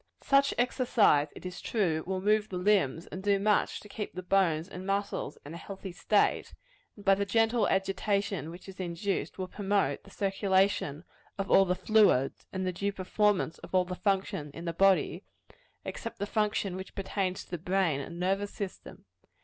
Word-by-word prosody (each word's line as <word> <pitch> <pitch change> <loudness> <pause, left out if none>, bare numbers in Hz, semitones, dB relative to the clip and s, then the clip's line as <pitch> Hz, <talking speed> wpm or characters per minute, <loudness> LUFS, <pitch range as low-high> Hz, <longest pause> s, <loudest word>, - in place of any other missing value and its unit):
Such 275 0 +3
exercise, 240 - +3
it - - -11
is 180 0 -6
true, 170 -8 0
will 190 0 -2
move 210 +1 +2
the 185 - -4
limbs, 180 -5 +2
and 185 - -7
do 200 0 +3
much 205 +1 +1
to - - -13
keep 210 0 -6
the 185 - -5
bones 180 -4 +2
and 185 -1 -8
muscles 200 +1 -2
in 145 - -8
a - - -6
healthy 195 +1 -8
state; 190 +4 +1 0.4
and 205 - -14
by 195 - +6
the 200 +1 +1
gentle 225 +3 +2
agitation 195 -2 0
which 175 +3 -11
is 190 -1 -11
induced, 185 +2 -2
will 185 -1 -3
promote 200 +1 0
the - - -15
circulation 195 -6 +1 0.3
of 195 -1 -3
all 195 - +7
the 180 0 +1
fluids, 190 - +3
and 190 -1 -3
the 185 - -1
due 200 +3 -1
performance 200 -2 0
of - - -7
all 185 -1 +4
the 180 - -5
functions 190 -7 -1
of 170 - -7
the 170 - -2
body 190 0 +3 0.6
except 230 - -6
the 205 - -2
function 210 -3 0
which 190 0 -8
pertains 195 -1 -2
to - - -25
the 175 - -3
brain 180 -4 +1
and 170 +5 -8
nervous 195 +3 0
system. 200 -3 -7
195 Hz, 185 wpm, -30 LUFS, 180-205 Hz, 0.6 s, all